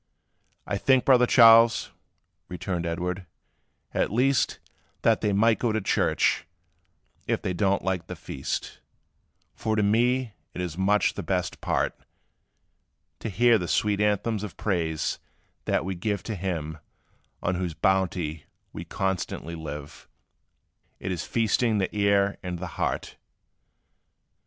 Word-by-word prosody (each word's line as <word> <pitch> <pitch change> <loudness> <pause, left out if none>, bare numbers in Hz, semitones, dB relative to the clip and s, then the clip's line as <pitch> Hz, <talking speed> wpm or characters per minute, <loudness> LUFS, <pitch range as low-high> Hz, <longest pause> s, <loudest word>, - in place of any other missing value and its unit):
"I - - -2
think, 130 -2 +3
brother 125 -2 +5
Charles," 115 -1 +6 0.6
returned 90 -1 -3
Edward, 90 +2 -3 0.7
"at - - 0
least, 130 +5 +2 0.5
That - - +3
they 105 - +1
might 110 +3 +3
go 120 - +1
to 110 - 0
church, 100 - +1 0.8
if - - +1
they 90 - -1
do 95 +2 +1
n't 100 - 0
like 95 -3 -2
the - - -6
feast; - - -5 0.7
For 110 -1 -2
to 105 - +2
me 120 +3 +2 0.2
it - - -5
is 90 -3 -3
much 100 +3 +2
the - - -5
best - - -2
part, - - 0 1.3
To - - -4
hear 115 +3 +4
the 90 - -3
sweet 105 +2 +1
anthems 105 +1 +1
of 105 - -7
praise, 80 -6 -1 0.5
that - - 0
we 95 - -2
give 100 +2 -2
To 110 - -4
Him, 80 -4 -4 0.6
on 90 - +1
whose 90 -3 -3
bounty 90 -6 0 0.3
we - - -6
constantly 95 -3 -3
live: 75 -3 -8 0.9
It 95 - -4
is 85 -3 -3
feasting 115 0 +1
the 95 +1 -1
ear 100 -1 +2
and 90 -1 -4
the 90 - -5 0.2
heart. - - -2
100 Hz, 135 wpm, -26 LUFS, 90-110 Hz, 1.3 s, Charles